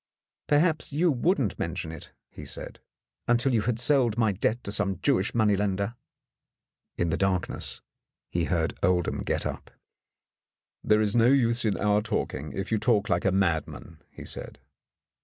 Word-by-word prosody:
"Perhaps 155 +2 +2
you 165 +4 +2
wouldn't 135 - 0
mention 80 - -3
it," 80 - -10 0.2
he - - -10
said, - - -6 0.5
"until 120 +2 +2
you 115 - +3
had 115 0 -1
sold 125 -4 +3
my 110 -3 +3
debt 110 +5 -1
to 100 - -4
some 100 -3 -1
Jewish 120 -8 +1
money 110 -3 +3
lender." 100 +2 -1 1.0
In 85 -2 0
the - - 0
darkness 95 -2 -1 0.5
he 85 -1 -1
heard 80 -2 0
Oldham 90 -2 +1
get - - -2
up. - - -5 1.1
"There 105 0 +3
is 105 0 0
no 115 0 +5
use 120 -3 +3
in 105 -3 +1
our 105 0 +2
talking,, 75 - -3
if 95 +2 -5
you 110 - +2
talk 105 -3 +2
like 85 - +1
a 95 - +4
madman," 85 -3 -1
he - - -11
said. - - -6
105 Hz, 160 wpm, -27 LUFS, 95-120 Hz, 1.1 s, no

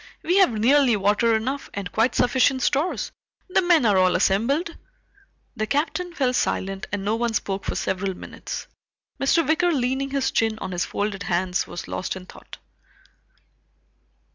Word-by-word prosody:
"We 355 +4 +2
have 380 -10 +5
nearly 250 +3 +4
water 210 +3 +2
enough, 265 +6 -3
and 200 -3 -4
quite 225 +3 +1
sufficient 260 +1 +2
stores. 300 +7 0 0.4
The 370 - +3
men 345 -7 +4
are 200 -3 +4
all 185 -1 +3
assembled." 245 - +1 0.8
The 215 - -2
Captain 335 - -1
fell 255 -5 +1
silent 195 -5 -1
and 200 -1 -3
no 215 +2 +1
one 235 -1 -1
spoke 195 -1 -2
for - - -2
several 190 0 -2
minutes. - - -7 0.5
Mr. 310 +4 +2
Wicker 335 +3 +2
leaning 265 -1 0
his 275 -1 0
chin 225 -1 +1
on 185 - -6
his 175 -1 -1
folded 205 -1 -3
hands 180 0 -1
was - - -7
lost 185 - -3
in 185 -1 -9
thought. - - -13
230 Hz, 160 wpm, -23 LUFS, 195-280 Hz, 0.8 s, have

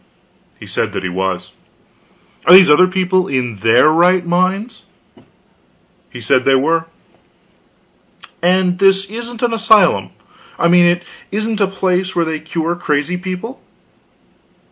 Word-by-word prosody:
He - - -11
said - - -4
he 95 - -4
was. 95 0 -4 1.0
"Are - - +7
these 185 -5 +7
other 185 +5 +5
people 185 0 -1
in 125 -5 -3
their 115 +8 +3
right 175 +2 +2
minds?" 190 +6 -2 1.3
He - - -11
said 125 +2 +1
they 135 0 +3
were. 160 +5 0 1.6
"And 180 +1 +1
this 195 0 +3
isn't 235 +3 -8
an 235 -1 0
asylum? 210 - +2 0.5
I 170 - +1
mean, 175 0 +5
it 175 0 0 0.3
isn't 215 +1 -3
a 200 - +3
place 185 -1 -2
where 170 -1 0
they 160 -1 -4
cure 165 +2 -4
crazy 155 0 -2
people?" 185 +7 -7
180 Hz, 130 wpm, -15 LUFS, 155-195 Hz, 1.6 s, Are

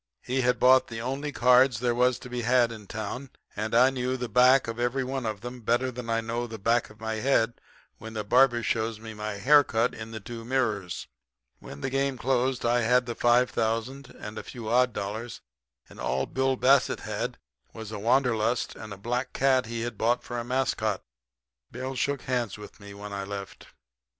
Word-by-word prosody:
He 130 +1 0
had 125 0 +2
bought 130 +1 +6
the 115 -1 -6
only 135 +5 -3
cards 125 -2 +4
there 120 0 +1
was 125 +1 +2
to - - -10
be 125 -1 -4
had 120 0 +3
in 110 -3 -10
town; 110 +6 -5 0.3
and 110 +2 -2
I 125 +3 +6
knew 130 0 -2
the 125 -1 -3
back 125 +2 +5
of 115 +1 -5
every 120 +2 0
one 130 -2 -3
of 105 -2 -4
them 120 0 -7
better 120 +3 +1
than 120 -1 -7
I 115 0 +1
know 115 +1 -3
the 110 -1 -7
back 115 +3 +1
of 105 +1 -17
my 110 0 -3
head 120 -1 +1 0.4
when 110 +1 -8
the 105 - -2
barber 120 +2 +4
shows 110 0 -1
me 110 0 -8
my 105 0 -4
haircut 125 0 +4
in 110 0 -8
the 110 -1 -6
two 115 +2 -8
mirrors. 110 -8 -1 0.5
"When 70 - -10
the - - -2
game 135 0 0
closed 130 0 0
I 120 +1 +3
had 125 +2 +3
the 120 - -3
five 120 +2 +3
thousand 115 +5 -2
and 105 +1 -7
a - - -8
few 115 -4 -7
odd 125 +2 +4
dollars, 110 +3 -5 0.5
and - - -15
all 65 +1 -1
Bill 130 0 0
Bassett 135 +1 +3
had - - -4 0.3
was 110 -1 -8
the 105 - -5
wanderlust 120 0 +1
and 110 -1 -9
a 100 - -7
black 125 +5 -3
cat 130 -2 +2
he 115 0 -4
had 115 -2 -5
bought 120 +2 +1
for 120 -1 -4
a - - -3
mascot. 120 -5 -1 0.7
Bill 130 +1 -5
shook 140 0 -1
hands 120 -5 -2
with 105 - -12
me 100 -1 -11
when 100 0 -8
I 100 0 -3
left. 100 0 -7
120 Hz, 205 wpm, -27 LUFS, 110-125 Hz, 0.7 s, bought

